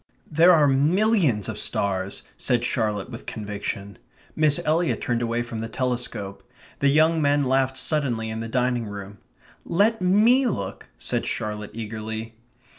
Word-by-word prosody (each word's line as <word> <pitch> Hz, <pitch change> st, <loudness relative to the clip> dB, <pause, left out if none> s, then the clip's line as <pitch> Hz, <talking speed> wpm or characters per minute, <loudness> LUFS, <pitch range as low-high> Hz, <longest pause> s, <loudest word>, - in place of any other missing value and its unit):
"There 165 Hz, +4 st, +6 dB
are 155 Hz, -4 st, +5 dB
MILLIONS 150 Hz, -, +2 dB
of -, -, -4 dB
stars," 95 Hz, -1 st, -1 dB
said 120 Hz, -2 st, 0 dB
Charlotte 110 Hz, -2 st, -1 dB
with 115 Hz, -, -9 dB
conviction. 100 Hz, -1 st, -5 dB, 0.4 s
Miss 155 Hz, -2 st, +3 dB
Eliot 165 Hz, +2 st, +1 dB
turned 120 Hz, -1 st, -1 dB
away 120 Hz, 0 st, -1 dB
from 120 Hz, -2 st, -6 dB
the 115 Hz, 0 st, -4 dB
telescope. 120 Hz, -5 st, -3 dB, 0.4 s
The 140 Hz, -, +3 dB
young 160 Hz, +3 st, +4 dB
men 145 Hz, 0 st, +3 dB
laughed 130 Hz, 0 st, +1 dB
suddenly 130 Hz, -7 st, -1 dB
in 110 Hz, -, -4 dB
the 115 Hz, -, -4 dB
dining 125 Hz, -1 st, 0 dB
room. 100 Hz, 0 st, -8 dB, 0.4 s
"Let 205 Hz, +4 st, +2 dB
ME 220 Hz, +8 st, +4 dB
look," 100 Hz, -, -4 dB
said -, -, -2 dB
Charlotte 105 Hz, -1 st, -3 dB
eagerly. 110 Hz, 0 st, -5 dB
120 Hz, 145 wpm, -24 LUFS, 110-155 Hz, 0.4 s, There